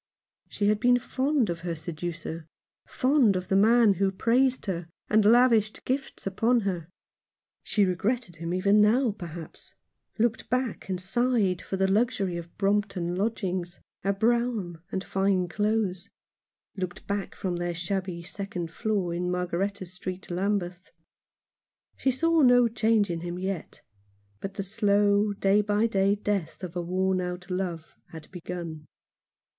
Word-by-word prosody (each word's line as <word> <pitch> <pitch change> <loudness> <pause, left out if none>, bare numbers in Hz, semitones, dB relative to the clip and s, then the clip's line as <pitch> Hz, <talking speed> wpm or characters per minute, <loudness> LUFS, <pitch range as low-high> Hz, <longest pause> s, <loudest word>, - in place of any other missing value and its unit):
She 205 - -1
had 210 0 +3
been 245 +2 +5
fond 265 0 0
of 170 - -4
her 170 0 -3
seducer 165 0 -6 0.2
— - - -68
fond 255 -6 +3
of 185 0 -3
the 195 - +2
man 220 +1 +5
who 195 +1 +1
praised 250 +6 +2
her, 175 -4 -3 0.2
and 215 0 +5
lavished 225 -1 +4
gifts 270 +1 -3
upon 230 +5 +2
her. 180 -5 -3 0.7
She 205 -2 +2
regretted 190 +1 -1
him 165 +1 -4
even 200 +3 +4
now, 230 +3 +4
perhaps; 170 -5 -9 0.4
looked 230 0 0
back 250 -5 -2
and 185 -1 -1
sighed 195 -1 +1
for 190 - -4
the 190 0 +2
luxury 200 -3 +1
of 170 0 -8
Brompton 195 -3 0
lodgings, 185 -4 -2 0.2
a 195 - +2
brougham, 220 -5 0
and 190 - -2
fine 190 -2 +1
clothes; 205 -1 -1 0.7
looked 185 -1 -5
back 200 -1 -3
from 180 -2 -2
their 175 0 -2
shabby 180 0 -3
second 180 -2 -5
floor 195 -2 -1
in 180 +1 -2
Margaretta 180 +2 -2
Street, 185 +1 -7
Lambeth. 185 -1 -2 1.1
She 270 - 0
saw 330 +5 +2
no 245 -2 +6
change 220 -3 +2
in 170 - -2
him 175 +1 -5
yet; 190 -2 -5 0.6
but 195 - -6
the 195 - -3
slow, 205 +1 +2
day 200 +1 +3
by 210 +1 +1
day 200 -2 +2
death 200 -4 -3
of 180 -1 -6
a 175 - -1
worn 185 +2 0
out 180 +1 -5
love 180 -4 -3 0.2
had 160 -2 -11
begun. 170 -3 -6
195 Hz, 150 wpm, -27 LUFS, 180-215 Hz, 1.1 s, no